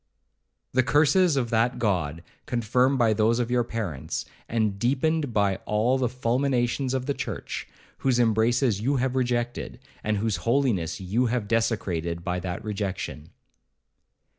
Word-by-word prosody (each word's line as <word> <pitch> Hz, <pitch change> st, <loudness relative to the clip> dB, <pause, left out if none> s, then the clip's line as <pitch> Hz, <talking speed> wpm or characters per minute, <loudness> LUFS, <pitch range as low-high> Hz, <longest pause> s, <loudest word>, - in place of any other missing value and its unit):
The 130 Hz, -, +4 dB
curses 150 Hz, +4 st, +3 dB
of 120 Hz, -3 st, -1 dB
that 120 Hz, +2 st, +2 dB
God, 85 Hz, -8 st, -1 dB, 0.2 s
confirmed 125 Hz, +3 st, +2 dB
by 115 Hz, -3 st, +4 dB
those 110 Hz, +2 st, +2 dB
of 120 Hz, -1 st, -1 dB
your 125 Hz, -1 st, +3 dB
parents, 105 Hz, -, -4 dB, 0.2 s
and 110 Hz, -3 st, 0 dB
deepened 140 Hz, +4 st, +1 dB
by 100 Hz, -3 st, +2 dB
all 115 Hz, +5 st, +2 dB
the 125 Hz, -2 st, +1 dB
fulminations 125 Hz, +1 st, 0 dB
of 130 Hz, -1 st, -2 dB
the 140 Hz, -, 0 dB
church, -, -, -5 dB, 0.3 s
whose 130 Hz, -2 st, +2 dB
embraces 115 Hz, 0 st, +2 dB
you 135 Hz, +5 st, +1 dB
have 130 Hz, 0 st, 0 dB
rejected, 120 Hz, -1 st, -1 dB, 0.3 s
and 105 Hz, -1 st, 0 dB
whose 110 Hz, 0 st, 0 dB
holiness 115 Hz, -, 0 dB
you 105 Hz, +7 st, 0 dB
have 115 Hz, -3 st, -1 dB
desecrated 90 Hz, -7 st, -1 dB
by 90 Hz, 0 st, -1 dB
that 90 Hz, -1 st, -5 dB
rejection.' 95 Hz, -7 st, -4 dB
115 Hz, 140 wpm, -26 LUFS, 105-125 Hz, 0.3 s, The